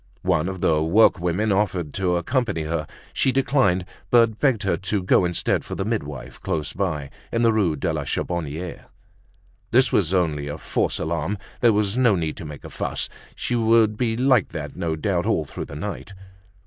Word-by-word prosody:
One 80 +4 +1
of 95 -1 -6
the 75 -1 +3
workwomen 90 +2 +3
offered 95 -7 -1
to 90 -2 +1
accompany 100 - 0
her; 75 0 -2 0.3
she 135 - +2
declined, 130 -9 +2 0.2
but 115 -2 +4
begged 130 -8 +2
her 95 - +1
to 100 0 -2
go 90 0 +4
instead 85 -1 0
for - - -6
the 95 - -2
midwife, 85 - -4
close 75 -3 -2
by, 75 -8 -2 0.2
in 115 0 +1
the 115 -1 +4
Rue 95 -8 +2
de 80 +3 -1
la 75 -2 -2
Charbonniere. 85 +3 -3 0.8
This 130 +2 +4
was 90 -5 +2
only 80 -6 0
a 75 +1 -4
false - - -1
alarm; 85 +5 -2 0.2
there 120 - +5
was 105 +2 +1
no 120 -5 +5
need 80 -3 -2
to 85 - -7
make 75 -2 -9
a - - -9
fuss. - - -2 0.3
She - - -3
would 115 -2 +4
be 115 -1 0
like 130 -5 +3
that 75 -2 -6
no 85 -3 -2
doubt 80 - -1
all - - +1
through - - -6
the 70 - -9
night. 100 +4 -6
95 Hz, 185 wpm, -23 LUFS, 80-110 Hz, 0.8 s, there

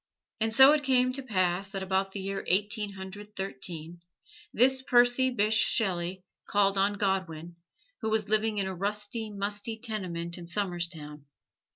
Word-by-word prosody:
And 225 0 +1
so 265 +5 +8
it 300 -1 +2
came 255 -2 +3
to 275 - -3
pass 190 -5 0
that 195 -1 -4
about 190 +1 0
the 195 - -5
year 195 +1 -4
Eighteen 205 +2 0
Hundred 200 +2 -9
Thirteen, 170 -1 -5 0.5
this 260 +3 +3
Percy 245 0 +4
Bysshe 215 -3 +3
Shelley 185 -4 -1 0.3
called 200 -1 +3
on 195 +1 +2
Godwin, 175 -5 -2 0.4
who 220 - -1
was 215 -1 +1
living 215 0 +1
in 200 - 0
a 190 - -3
rusty, 210 +4 -3
musty 205 +2 -4
tenement 180 -7 -4
in 170 - -9
Somerstown. 170 -6 -4
200 Hz, 155 wpm, -29 LUFS, 185-220 Hz, 0.5 s, so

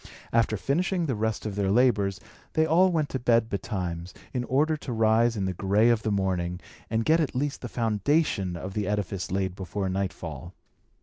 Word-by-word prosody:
After 115 -2 +2
finishing 175 - 0
the 135 - 0
rest 110 0 -2
of 105 - -3
their 100 -1 0
labours, 105 -3 +3 0.3
they 160 - +3
all 180 +4 +4
went 155 -4 +1
to 130 - -3
bed 115 -2 +3
betimes, 90 -3 -4 0.2
in 125 -2 -1
order 150 +5 +2
to 145 -4 -7
rise 115 +1 +3
in 95 - -1
the 95 - -1
gray 100 +5 +3
of 115 -2 +3
the 110 - -1
morning, 90 -3 -1 0.3
and 115 0 0
get 160 +1 +4
at 150 -6 -1
least 140 +2 -1
the 120 - -5
foundation 110 - 0
of 95 +2 -6
the 105 -2 -2
edifice 100 -3 -2
laid 95 -1 -1
before 95 +1 -3
nightfall. 85 -4 -4
110 Hz, 190 wpm, -27 LUFS, 95-125 Hz, 0.3 s, all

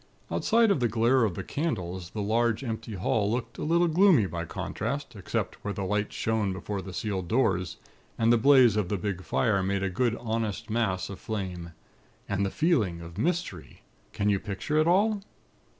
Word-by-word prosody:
Outside 230 -2 +3
of 175 - +2
the 120 - +2
glare 120 +3 +3
of 95 -6 -2
the - - -4
candles, 90 - -3
the 105 +1 -4
large 115 +3 +1
empty 115 -2 -4
hall 100 +2 0
looked 120 0 -3
a - - -3
little 170 +3 +3
gloomy, 170 - +5
by 85 -2 -4
contrast, 115 - -4
except 95 -3 -4
where 100 0 -3
the 100 - -3
lights 105 +2 -1
shone 110 -3 0
before 95 +2 -4
the 95 - -8
sealed 95 -2 -3
doors, 95 -5 +1 0.4
and 115 +1 +4
the - - +5
blaze 130 -3 +6
of 105 -4 0
the 105 - 0
big 95 0 -3
fire 105 -2 +1
made 100 +1 -1
a 95 - -1
good 120 +3 +1
honest 110 -3 -3
mass 105 -5 0
of 95 - -8
flame. 90 -6 -5 0.5
And 100 0 0
the 100 - 0
feeling 110 - +1
of 85 0 -9
mystery! 170 - -3 0.3
Can 105 -1 -1
you 100 -2 +3
picture 105 +11 -2
it 155 - +3
all? 205 +4 +3
110 Hz, 190 wpm, -28 LUFS, 95-125 Hz, 0.5 s, blaze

